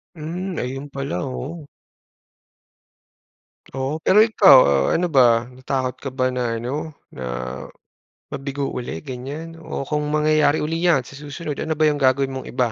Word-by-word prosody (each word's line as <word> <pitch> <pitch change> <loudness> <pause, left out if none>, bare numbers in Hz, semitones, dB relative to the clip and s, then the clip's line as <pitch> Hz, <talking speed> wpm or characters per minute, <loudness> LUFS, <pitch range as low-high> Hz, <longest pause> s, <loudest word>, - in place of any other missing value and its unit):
Hmm, 175 +3 -5
ayun 135 +3 -4
pala 140 0 -4
oo. 145 +4 -6 2.1
Oo, 135 +4 -2
pero 190 - +3
ikaw, 205 -9 +7
ah, 70 -1 +2
ano 175 - +1
ba, 120 -3 +5
natakot 130 +1 -3
ka 140 - -4
ba 130 -1 -1
na, 120 -2 -1
ano 130 +7 -4 0.2
na, 65 - -7 1.1
mabigo 140 0 -3
uli 100 -10 -5
ganiyan, 145 +6 -7
o 160 - -5
kung 150 +2 -2
mangyayari 150 0 +2
uli 165 +2 -2
'yan 145 -7 +4
sa - - -13
susunod, 150 0 -6
ano 160 - -2
ba 155 - +1
'yung 145 - -3
gagawin 135 0 +2
mong 130 0 -6
iba? 125 -2 0
140 Hz, 150 wpm, -22 LUFS, 130-155 Hz, 2.1 s, ikaw